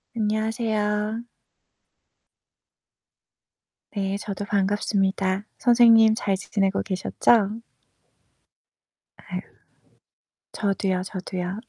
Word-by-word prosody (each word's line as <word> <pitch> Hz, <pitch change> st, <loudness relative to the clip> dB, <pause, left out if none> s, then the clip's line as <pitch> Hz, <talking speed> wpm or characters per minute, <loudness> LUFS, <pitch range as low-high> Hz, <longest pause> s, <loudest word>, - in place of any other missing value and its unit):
안녕하세요. 215 Hz, 0 st, -1 dB, 2.7 s
네. 195 Hz, -1 st, -2 dB
저도 205 Hz, -1 st, -5 dB
반갑습니다. 195 Hz, -1 st, 0 dB
선생님 230 Hz, -2 st, +6 dB
잘 200 Hz, -3 st, 0 dB
지 -, -, -11 dB
지내고 195 Hz, -2 st, +1 dB
계셨죠? 210 Hz, +3 st, +1 dB, 1.6 s
아휴. -, -, -6 dB, 1.1 s
저도요, 195 Hz, -3 st, -1 dB
저도요. 185 Hz, 0 st, -5 dB
205 Hz, 165 characters per minute, -24 LUFS, 195-220 Hz, 2.7 s, 선생님